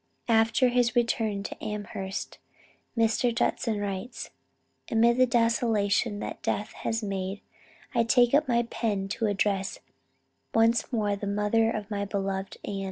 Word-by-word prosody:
After 225 +3 +4
his 245 0 +2
return 225 -4 +1
to - - -7
Amherst, 205 -2 -5 0.6
Mr. 230 +1 +2
Judson 230 -2 0
writes: 200 +4 -5 0.6
"Amid 235 +1 +4
the 255 0 +5
desolation 230 -2 +2
that - - -6
death 210 - -2
has 225 0 -3
made, 195 0 -3 0.5
I 235 -2 +3
take 245 +1 +4
up 295 +1 +4
my 235 -1 +2
pen 210 -4 -2
to 220 +2 -1
address 200 -1 0 0.8
once 225 +3 +3
more 210 -4 +1
the 200 0 -5
mother 210 +3 +2
of 215 -1 -4
my 200 -1 -1
beloved 195 -1 -3
Ann. 200 -1 -3
220 Hz, 140 wpm, -27 LUFS, 200-235 Hz, 0.8 s, the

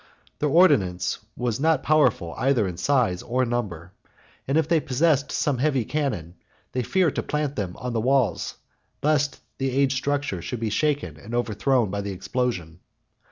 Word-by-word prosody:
Their 150 - +1
ordnance 135 - +3 0.2
was 120 -1 -1
not 160 +2 +2
powerful, 125 - +2
either 130 -6 +2
in 90 -2 -5
size 110 -4 +1
or 125 +1 0
number; 100 -8 -3 0.6
and 135 +3 +2
if 160 -2 +2
they 165 -1 +3
possessed 145 0 +1
some 145 -5 0
heavy 135 -4 +1
cannon, 105 - -2 0.3
they 125 - -1
feared 175 +4 +2
to - - +2
plant 150 -1 -2
them 95 -4 -3
on 125 0 -4
the 115 - 0
walls, 125 -6 +1 0.5
lest 145 -1 +1 0.2
the 135 0 0
aged 135 0 +2
structure 140 -8 -1
should 120 +7 -5
be 110 -2 -2
shaken 140 - 0
and 110 +10 -7
overthrown 120 -1 +1
by 100 0 -2
the 100 -1 -4
explosion. 95 -4 -3
125 Hz, 165 wpm, -25 LUFS, 100-145 Hz, 0.6 s, ordnance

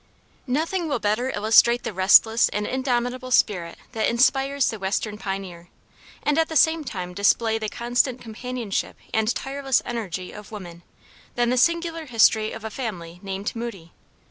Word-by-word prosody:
Nothing 325 +7 -1
will 290 - 0
better 220 +4 0
illustrate 225 +2 +4
the 230 - -4
restless 210 +5 +5
and 210 0 -2
indomitable 255 0 -2
spirit 180 -8 +1
that 225 -3 0
inspires 270 +3 +2
the 220 - -7
western 200 +2 -2
pioneer, 190 -4 -6 0.5
and 295 +1 +2
at 325 - +1
the 320 - -5
same 320 +1 +4
time 180 -8 -6
display 220 +3 +2
the 215 -1 -3
constant 245 +2 0
companionship 235 -2 -4 0.2
and 220 +1 +1
tireless 270 -1 0
energy 195 -7 -4
of 210 0 -11
woman, 175 -5 -9 0.5
than 240 0 +1
the - - +2
singular 335 +3 +1
history 220 -2 +3
of 225 - -8
a 220 - -5
family 175 -9 -6
named 195 +2 -4
Moody. 215 -8 -6
230 Hz, 155 wpm, -24 LUFS, 205-255 Hz, 0.5 s, restless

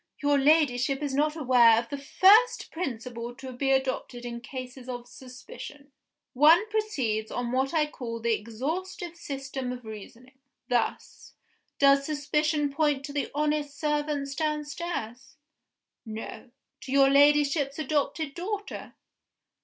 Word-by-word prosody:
Your 285 0 +3
Ladyship 275 -2 +3
is 285 -2 -2
not 300 +2 +1
aware 245 -6 +5
of 230 0 -2
the 285 - -4
first 415 - +4
principle 240 -6 -5
to 260 0 -8
be 270 +2 -1
adopted 265 -2 -1
in 235 0 -6
cases 255 0 -8
of 245 -1 -6
suspicion. 280 - -11 0.4
One 320 - +6
proceeds 260 - -1
on 245 -1 -3
what 265 +1 0
I 320 -2 +2
will 300 - -5
call 230 -2 -6
the 230 0 +1
exhaustive 315 - -4
system 270 -5 -5
of 250 -2 -8
reasoning. 230 +5 -11 0.3
Thus: 245 -3 -2 0.4
Does 275 0 +5
suspicion 300 0 0
point 290 -2 +1
to 285 - -8
the 285 - -2
honest 295 -1 -1
servants 295 -2 -1
downstairs? 295 -4 -4 0.7
No. 220 +1 -8 0.3
To 260 - -9
your 275 0 +5
Ladyship's 285 0 +4
adopted 300 0 -1
daughter? 405 +5 -5
275 Hz, 130 wpm, -27 LUFS, 250-300 Hz, 0.7 s, One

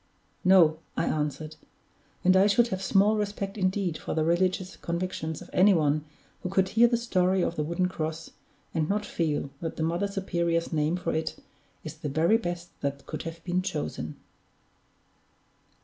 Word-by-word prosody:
"No," 170 -4 +6 0.2
I - - +1
answered. 150 +1 -2 0.7
"And 185 +1 +5
I 190 +2 +6
should 235 +4 +3
have 190 -3 -3
small 205 +2 +3
respect 205 -1 -3
indeed 185 -3 0
for - - -4
the 160 - +2
religious 185 +3 +1
convictions 170 -2 -3
of - - -15
any 195 +1 +6
one 150 -1 +1 0.4
who 180 - -3
could 190 0 +2
hear 235 +2 +5
the 235 0 +1
story 190 -5 +1
of 170 - -1
that 150 - -1
wooden 170 +3 0
cross, 160 -2 -4 0.4
and 160 -2 0
not 210 +1 0
feel 150 -7 -1
that 165 -1 -4
the 160 - -2
Mother 170 +5 0
Superior's 170 -4 -1
name 155 +2 +1
for 180 - -2
it 160 0 -2 0.5
is - - -7
the 150 - -4
very 165 +9 +3
best 175 -5 -4
that 140 0 -3
could - - -5
have 165 0 -13
been 180 0 0
chosen." 185 - -4
175 Hz, 170 wpm, -28 LUFS, 160-190 Hz, 0.7 s, No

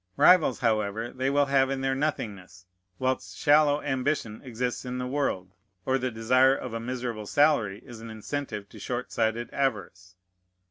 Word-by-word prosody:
Rivals, 170 -8 +5
however, 110 0 0
they 130 +1 -1
will 145 +1 +3
have 135 -1 +3
in 135 -1 -2
their 135 0 +1
nothingness, 105 -10 -4 0.3
whilst 130 0 -2
shallow 145 0 +4
ambition 130 -4 -1
exists 125 -1 -3
in 125 0 -4
the 125 - -3
world, 125 -9 -2 0.3
or 135 0 +1
the 130 0 -1
desire 130 +4 +3
of 125 -4 -6
a 115 - -2
miserable 120 -3 -4
salary 120 -9 +2
is 120 -2 -10
an 115 - -8
incentive 110 -1 -5
to - - -13
short 125 0 -4
sighted 110 +1 -1
avarice. 95 -8 -2
125 Hz, 165 wpm, -27 LUFS, 110-135 Hz, 0.3 s, Rivals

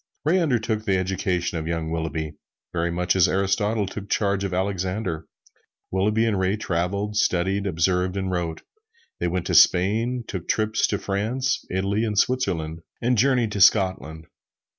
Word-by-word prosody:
Ray 175 +5 +3
undertook 115 -9 0
the 95 -1 +2
education 90 -2 -1
of 80 - -5
young 80 -1 -2
Willughby, 80 -2 -3 0.4
very 85 0 0
much 90 +2 0
as 95 - +5
Aristotle 100 +3 +1
took 100 +1 -7
charge 100 -1 +1
of 100 - -2
Alexander. 95 -2 -2 0.6
Willughby 105 +4 +2
and 105 -4 0
Ray 95 +2 +1
traveled, 100 +3 -2
studied, 95 +2 +1
observed 90 +2 0
and 95 -1 -2
wrote. 85 -3 -3 0.6
They 90 - 0
went 90 0 -2
to - - -2
Spain, 115 +7 +4
took 90 -3 -6
trips 110 0 +1
to 100 - -1
France, 115 +8 -1
Italy 100 +4 0
and 105 -3 -2
Switzerland, 90 -10 0 0.2
and 125 +2 +1
journeyed 120 -1 +2
to 100 - -2
Scotland. 95 - +3
95 Hz, 155 wpm, -24 LUFS, 90-105 Hz, 0.6 s, as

